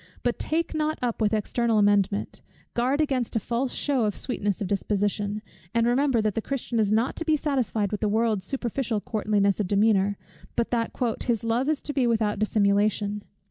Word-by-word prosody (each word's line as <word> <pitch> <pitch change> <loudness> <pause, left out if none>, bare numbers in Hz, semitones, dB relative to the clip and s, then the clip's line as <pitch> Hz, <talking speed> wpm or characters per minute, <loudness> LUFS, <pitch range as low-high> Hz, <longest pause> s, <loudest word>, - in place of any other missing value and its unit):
But 245 -1 0
take 330 +2 -1
not 310 0 0
up 235 -2 -1
with 210 -1 +3
external 225 +1 +1
amendment; 205 -1 +2 0.3
guard 260 +5 +1
against 265 -7 -1
a - - +3
false 245 +4 -1
shew 280 -4 +1
of 210 -3 0
sweetness 205 -6 -2
of 205 - -2
disposition; 205 +1 -1 0.3
and 230 0 +3
remember 245 0 +2
that 215 -1 +1
the 225 - -1
Christian 240 -2 -2
is 210 -2 +2
not 225 +4 +1
to - - -2
be 315 -1 +2
satisfied 240 -9 -1
with 210 - -3
the 210 - +1
world's 220 -3 +1
superficial 245 -3 -2
courtliness 205 -2 0
of 205 - 0
demeanor, 200 0 +2 0.4
but 235 - 0
that 230 -2 0 0.4
his 230 -4 0
"Love 235 +5 +1
is 310 -2 0
to 290 - -4
be 265 -4 +2
without 215 -3 +1
dissimulation." 205 -1 +1
225 Hz, 185 wpm, -26 LUFS, 205-250 Hz, 0.4 s, with